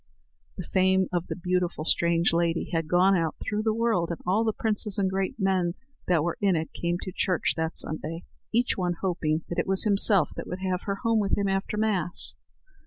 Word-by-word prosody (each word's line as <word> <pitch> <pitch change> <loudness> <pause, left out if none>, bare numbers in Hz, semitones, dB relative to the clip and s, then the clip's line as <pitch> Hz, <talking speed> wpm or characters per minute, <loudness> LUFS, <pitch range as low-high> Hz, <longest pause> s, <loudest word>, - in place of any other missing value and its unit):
The 180 - -5
fame 190 0 +3
of 175 -1 -1
the - - -4
beautiful 180 -3 -1
strange 170 0 +2
lady 170 0 0
had 165 -1 0
gone 180 +3 +4
out 165 -3 0
through 210 0 -2
the 220 0 +1
world, 225 -7 +1
and 170 - -4
all 195 +5 +2
the 220 - +1
princes 210 -1 -1
and 195 -2 +1
great 190 0 -2
men 185 -3 +1 0.3
that 170 -4 +2
were 170 0 -2
in 195 -3 +3
it 160 0 -3
came 175 0 -1
to 185 - -5
church 180 -1 0
that 160 0 -3
Sunday, 155 +2 -3 0.3
each 240 +2 +1
one 180 -2 -1
hoping 165 -4 -1
that 175 - -2
it - - -1
was 190 0 +4
himself 200 -2 +4
would 180 - -5
have 185 -1 -1
her 200 - -1
home 230 -1 +2
with 200 -2 0
him 200 -1 0
after 195 +2 -1
Mass. 200 -6 +1
185 Hz, 205 wpm, -26 LUFS, 170-200 Hz, 0.3 s, gone